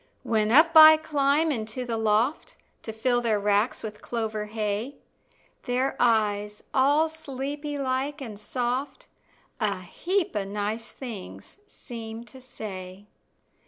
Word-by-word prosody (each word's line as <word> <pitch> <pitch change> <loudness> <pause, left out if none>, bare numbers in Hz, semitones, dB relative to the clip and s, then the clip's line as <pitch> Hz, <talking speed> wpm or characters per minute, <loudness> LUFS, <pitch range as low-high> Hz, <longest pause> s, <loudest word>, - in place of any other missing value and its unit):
When 215 -1 +1
up 315 +6 +6
I 315 0 +11
climb 305 0 +1
into 230 0 -3
the 235 -2 -2
loft 225 +6 0 0.3
To 220 - -6
fill 240 +2 +1
their 220 -3 +1
racks 205 +3 +1
with 210 -1 -7
clover 220 -2 -3
hay, 215 +4 -3 0.7
Their 255 +2 0
eyes, 210 -3 +1
all 290 +4 +4
sleepy 290 -1 -5
like 275 +2 -2
and 220 -7 -8
soft, 250 - -3 0.5
A 200 -3 -1
heap 355 - -2
of 205 -2 -2
nice 210 +3 -3
things 230 - -9
seem 230 - -8
to 260 +2 -14
say. 195 -5 -8
235 Hz, 125 wpm, -26 LUFS, 210-275 Hz, 0.7 s, I